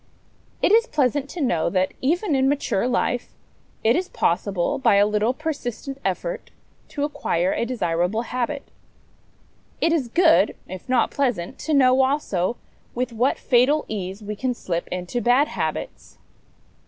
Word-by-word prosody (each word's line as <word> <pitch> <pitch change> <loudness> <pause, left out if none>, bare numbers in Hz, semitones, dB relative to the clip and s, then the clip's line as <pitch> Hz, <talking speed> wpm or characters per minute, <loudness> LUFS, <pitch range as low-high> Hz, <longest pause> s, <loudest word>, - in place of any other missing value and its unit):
It - - +4
is 460 +3 +5
pleasant 285 - 0
to 350 - -6
know 175 - +1
that, 185 +1 0
even 335 +6 +1
in 265 0 +3
mature 275 -6 0
life, 245 -1 -1 0.5
it 225 +2 +4
is 360 +2 -1
possible 190 +9 0
by 235 - +4
a 200 +1 +5
little 210 +2 +1
persistent 275 -2 -5
effort - - -3 0.4
to 285 - -4
acquire 185 - 0
a - - -1
desirable 195 -2 -1
habit. 255 +4 -3 1.2
It 330 - +2
is 290 -7 0
good, 320 - +4
if 185 +5 -9
not 250 -3 +2
pleasant, 245 -11 -1
to 310 -1 0
know, 260 -1 +5
also, 245 -7 0 0.4
with 250 0 -2
what 245 +4 +1
fatal 260 +5 +3
ease 195 0 -5
we 210 +1 -5
can 250 +3 -2
slip 170 -6 -3
into 180 +7 -3
bad 250 +5 +3
habits. - - -5
250 Hz, 150 wpm, -23 LUFS, 205-285 Hz, 1.2 s, is